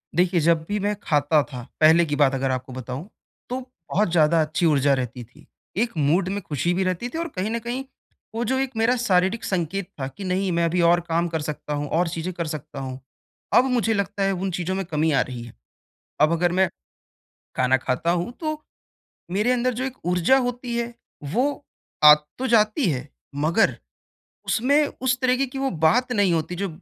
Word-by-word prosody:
देखिए, 175 0 +3
जब 165 0 +2
भी 210 0 -1
मैं 205 +1 0
खाता 150 0 +3
था, 125 -4 -8 0.2
पहले 160 +2 +6
की 145 -2 -2
बात 140 -2 +3
अगर 135 0 0
आपको 130 0 -4
बताऊँ 130 - -6 0.4
तो 255 +1 -2 0.3
बहुत 205 -2 +1
ज़्यादा 165 -1 +4
अच्छी 155 +3 0
ऊर्जा 145 -3 +3
रहती 125 -2 -3
थी। 140 +6 -19 0.3
एक 235 +3 +1
मूड 165 +6 +2
में 205 +1 -3
ख़ुशी 170 +1 -1
भी 190 - 0
रहती 185 +6 -2
थी 320 - -6
और 335 - -2
कहीं 185 +3 -1
न 235 - -1
कहीं 240 +3 -4 0.5
वो 235 - -1
जो 260 +3 0
एक 270 -1 -1
मेरा 230 +3 +3
शारीरिक 195 0 +1
संकेत 185 0 -2
था 130 - -2
कि 195 +8 -9
नहीं 185 0 0
मैं 170 0 +1
अभी 175 +2 +1
और 170 +1 +5
काम 170 +1 +1
कर 160 -2 -3
सकता 150 0 -5
हूँ 145 0 -2
और 170 +2 +1
चीज़ें 165 +2 -4
कर 170 -2 -3
सकता 150 -2 -6
हूँ। 130 -1 -6 0.6
अब 250 - +6
मुझे 225 -3 +2
लगता 200 -1 -1
है 195 - +2
उन 190 +1 -2
चीज़ों 180 +2 -2
में 195 -1 -2
कमी 160 -1 0
आ 140 - +3
रही 125 -2 -5
है। 120 - -11 0.7
अब 155 +2 +5
अगर 175 +1 +1
मैं 190 +1 +3 0.9
खाना 130 +1 +3
खाता 130 +6 -1
हूँ 175 +5 -1
तो 310 -1 -3 0.7
मेरे 210 +6 +2
अंदर 250 0 +1
जो 250 - -3
एक 265 -1 -4
ऊर्जा 180 +8 +3
होती 245 -1 -2
है 235 0 -3 0.4
वो 280 +3 0 0.4
आ 150 0 +11 0.2
तो 260 +1 -2
जाती 215 - +3
है, 140 -1 -3 0.3
मगर 160 +9 +2 0.7
उसमें 285 +6 +3 0.2
उस 260 -1 +2
तरीके 255 +1 +2
की 265 +1 -7
वो 270 0 0
बात 170 +10 +2
नहीं 205 -5 +3
होती 165 +2 -2
जो 195 +2 -2
180 Hz, 205 wpm, -23 LUFS, 155-230 Hz, 0.9 s, आ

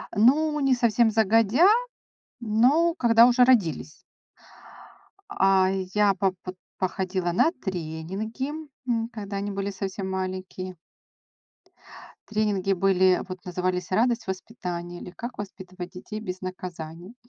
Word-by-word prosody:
Ну, 295 +8 +4
не 275 -2 +3
совсем 235 -1 +3
загодя, 225 - +4 0.7
но 250 +10 +3
когда 230 -1 +6
уже 250 0 +5
родились. 200 -11 +2 1.3
А 190 -1 +3 0.3
я 205 -1 +4
по 190 0 +1
под 185 0 -7 0.2
походила 185 -1 -1
на 250 - +3
тренинги, 190 - -5 0.4
м, 230 -1 0
когда 205 -2 -5
они 200 +1 -3
были 195 0 -3
совсем 195 0 -4
маленькие. 185 0 -4 1.5
Тренинги 205 -3 +1
были, 185 0 +3
вот, 185 -1 -8
назывались 180 0 -2
"Радость 230 +3 +1
воспитания", 180 -3 -5
или - - -8
"Как 235 +6 -8
воспитывать 185 -2 -8
детей 210 +3 -7
без 185 -4 -6
наказаний". 180 0 -7
195 Hz, 115 wpm, -25 LUFS, 185-230 Hz, 1.5 s, когда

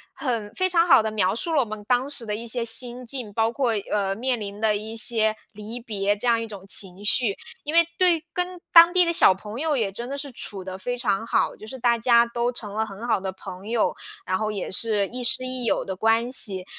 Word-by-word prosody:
很 230 -7 -3
非 370 - +1
常 345 -1 +2
好 225 - +6
地 220 - -2
描 200 -1 +1
述 330 +7 -3
了 300 - +3
我 255 - +2
们 215 -1 -8
当 255 +2 +1
时 265 -5 -5
的 210 - -3
一 235 +2 -7
些 235 0 0
心 245 +2 0
境， 245 -3 -5
包 225 +2 0
括， 240 -2 0 0.2
呃， 195 -2 0
面 245 +2 -1
临 205 -1 -7
的 220 -1 +2
一 215 +2 -6
些 220 -1 +1 0.2
离 215 +3 -7
别， 205 -4 -1
这 210 - -6
样 230 -1 +2
一 230 - -5
种 200 -3 -10
情 195 0 0
绪。 210 -1 +2 0.3
因 300 - -4
为， 335 0 +8
对 345 -3 +4
跟 360 0 -3
当 335 0 +9
地 365 -1 +5
的 340 - 0
小 190 - +6
朋 210 +5 -9
友 310 -1 0
也 215 -5 -1
真 235 +6 -7
的 280 - -4
是 280 -1 -6
处 200 -5 -5
得 185 0 -7
非 245 +6 -4
常 210 -3 -1
好， - - 0
就 215 - -13
是 260 - -8
大 235 -1 +2
家 235 0 +4
都 235 +1 -2
成 210 -4 -6
了 220 +1 -1
很 205 +2 -9
好 220 -4 +1
的 190 0 -4
朋 190 +1 -10
友， 230 0 0 0.3
然 185 - -1
后 215 +1 -2
也 200 -3 -5
是 210 0 +1
亦 250 +3 -6
师 255 +2 +2
亦 255 -1 -2
友 - - +1
的 190 - -5
关 225 +4 +1
系。 195 -8 +4
230 Hz, 270 characters per minute, -24 LUFS, 205-250 Hz, 0.3 s, 当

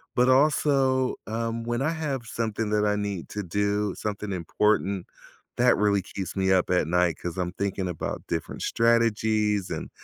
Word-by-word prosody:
But 125 +1 +4
also, 130 -1 +3
um, 115 +1 -2
when 120 +1 -1
I 145 - +1
have 145 -7 -3
something 110 -2 -2
that 105 0 +2
I 105 0 +2
need 100 -4 -3
to 105 - -4
do, 100 +2 0
something 105 -1 -4
important, 95 +1 0 0.5
that 125 0 +5
really 100 -1 +2
keeps 95 0 -6
me 95 -1 +1
up 95 -1 +3
at 90 -4 +2
night 90 0 +2
'cause 90 +1 -5
I'm 90 -1 -1
thinking 95 -1 -2
about 85 -3 -4
different 80 -2 -4
strategies 110 -3 +2
and, - - -4
105 Hz, 165 wpm, -26 LUFS, 95-115 Hz, 0.5 s, that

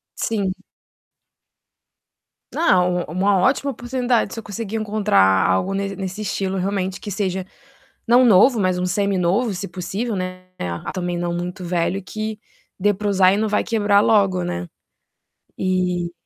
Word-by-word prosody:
Sim. 200 -4 -1 2.0
Não, 180 - +3
u - - -9
uma 195 +3 +2
ótima 275 +6 +2
oportunidade, 245 -3 -1
se 225 - -5
eu - - -9
conseguir 205 +1 -5
encontrar 100 - +3
algo 180 - +1
nes 195 0 -2
nesse 190 +2 -5
estilo, 195 -1 -2
realmente, 190 0 -2
que 205 - -6
seja, 190 -2 -2 0.6
não 245 +2 +6
novo, 225 +2 +5
mas 185 -2 +1
um 180 - 0
semi-novo, 195 +3 +1
se 195 +2 -5
possível, 200 +5 -4
né. 185 0 -5 0.2
Ah 85 -1 -4
também 175 -2 -3
não 175 0 -2
muito 180 +2 -4
velho, 175 +2 -1
que 215 +2 -5 0.4
dê 205 +2 +3
para 205 +2 -4
usar 190 -1 +4
e - - +1
não 220 0 0
vai 210 - +1
quebrar 205 -3 +2
logo, 195 -5 +3
né. 85 - -4 0.9
E, 180 -2 0
195 Hz, 150 wpm, -21 LUFS, 180-210 Hz, 2.0 s, não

